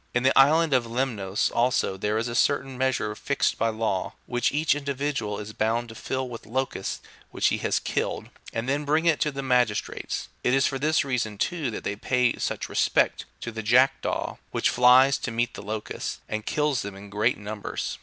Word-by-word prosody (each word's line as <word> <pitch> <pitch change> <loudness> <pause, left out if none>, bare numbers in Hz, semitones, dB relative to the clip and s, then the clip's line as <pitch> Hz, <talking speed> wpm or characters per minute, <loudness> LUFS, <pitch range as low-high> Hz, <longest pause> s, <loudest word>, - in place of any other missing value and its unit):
In 120 - +2
the 130 - +4
island 155 +3 +5
of 125 -3 +2
Lemnos 110 -5 -1
also, 120 -5 +1
there 105 +3 -1
is 115 +2 -1
a 120 - -4
certain 135 +1 +1
measure 125 -5 0
fixed 140 +5 -1
by 115 - +2
law, 110 -4 -2
which 120 0 0
each 150 +2 +2
individual 140 -6 -2
is 105 +1 -7
bound 115 +2 0
to - - -8
fill 130 +3 -3
with 115 -3 -9
locusts 130 +4 -2 0.3
which - - +1
he - - -1
has - - +1
killed, - - -2 0.2
and 115 +2 -3
then 140 +2 0
bring 155 +3 +1
it 165 -3 +3
to 150 - +2
the 140 0 -5
magistrates. 125 -5 0 0.2
It 125 - +3
is 135 - +3
for 135 - -1
this 155 +1 +2
reason, 115 -6 -2
too, 160 - -1
that 110 - -6
they 100 - -2
pay 125 +3 +1
such - - -2
respect - - +1 0.2
to 115 - -4
the 110 0 -5
jack 125 +5 +4
daw, - - -2
which - - +1
flies 125 +2 +6
to - - -3
meet 120 +1 -1
the - - -8
locusts, 105 +1 -5
and 110 0 -4
kills 150 -3 +1
them 100 -1 -6
in 100 +1 -11
great 110 +5 +1
numbers. 105 0 -5
125 Hz, 205 wpm, -26 LUFS, 110-135 Hz, 0.3 s, flies